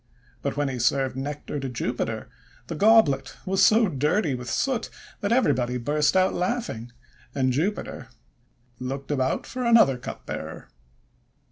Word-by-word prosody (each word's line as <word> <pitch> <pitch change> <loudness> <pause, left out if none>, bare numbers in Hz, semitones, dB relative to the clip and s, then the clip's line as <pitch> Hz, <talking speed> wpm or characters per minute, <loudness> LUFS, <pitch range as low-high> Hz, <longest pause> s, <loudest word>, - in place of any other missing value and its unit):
But - - -3
when 145 -1 +1
he 130 -2 -3
served 130 +2 +1
Nectar 145 +2 -4
to 135 -1 -4
Jupiter, 125 - -3 0.4
the - - -5
goblet 150 -9 +4
was 195 0 +2
so 220 +3 +5
dirty 150 +2 +1
with 125 -1 -5
soot 255 -4 -1 0.3
that 200 - -2
everybody 125 - +2
burst 150 +7 +1
out 185 0 +3
laughing, 180 - -2 0.4
and 130 -2 +1
Jupiter 155 - -2 0.7
looked 135 +3 -5
about 130 -2 0
for 255 -1 -5
another 230 - +5
cupbearer. - - -7
145 Hz, 135 wpm, -25 LUFS, 130-200 Hz, 0.7 s, so